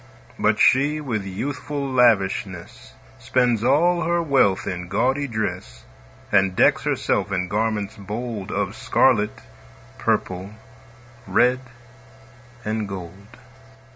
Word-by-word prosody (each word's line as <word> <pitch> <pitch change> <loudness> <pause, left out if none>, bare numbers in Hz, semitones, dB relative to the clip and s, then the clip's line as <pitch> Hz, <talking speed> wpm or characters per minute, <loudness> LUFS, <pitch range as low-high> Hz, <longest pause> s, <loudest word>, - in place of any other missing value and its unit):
But - - +2
she, 145 +4 +4
with 115 -9 -3
youthful 140 +7 -4
lavishness, 100 - 0 0.3
Spends 120 -3 +1
all 170 +7 +3
her 170 +1 +1
wealth 135 - +2
in 90 -1 -4
gaudy 130 +9 0
dress, 105 - -4 0.5
And 95 -1 +3
decks - - +3
herself 105 - 0
in 90 -1 -1
garments 105 0 -2
bold 105 0 -5
Of - - -2
scarlet, 105 -5 +2 0.6
purple, 95 +3 -2 0.7
red, 125 +1 +3 1.1
and 110 -1 -2
gold. 95 +1 -9
110 Hz, 105 wpm, -22 LUFS, 95-130 Hz, 1.1 s, she